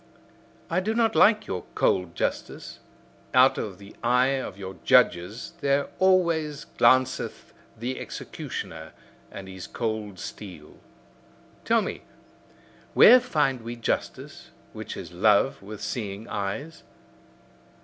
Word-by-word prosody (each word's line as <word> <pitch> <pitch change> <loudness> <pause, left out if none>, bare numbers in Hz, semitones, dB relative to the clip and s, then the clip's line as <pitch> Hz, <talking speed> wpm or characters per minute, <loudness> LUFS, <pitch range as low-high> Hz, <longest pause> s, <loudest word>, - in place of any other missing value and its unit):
I 170 - 0
do 215 +4 -2
not 225 -1 +2
like 215 0 +5
your 90 -1 -4
cold 90 -2 +1
justice; - - -4 0.6
out 130 +1 +5
of 100 -4 -5
the 100 +1 -14
eye 125 +3 +2
of 100 -6 -7
your 95 -1 -8
judges 90 +7 +2
there 140 0 +1
always 170 -6 +2
glanceth 130 +2 +2 0.2
the 125 +3 -4
executioner 80 -1 -7 0.4
and 95 - -9
his 95 -2 -9
cold 110 -4 -4
steel. 90 -6 -10 0.9
Tell - - +3
me: - - -5 0.9
where 250 +3 +9
find 150 - 0
we 115 +1 -6
justice, 115 - -4 0.2
which - - -7
is - - -8
love 105 +7 +3
with 105 +1 -9
seeing 105 -2 -4
eyes? 100 +12 -4
115 Hz, 120 wpm, -26 LUFS, 100-145 Hz, 0.9 s, where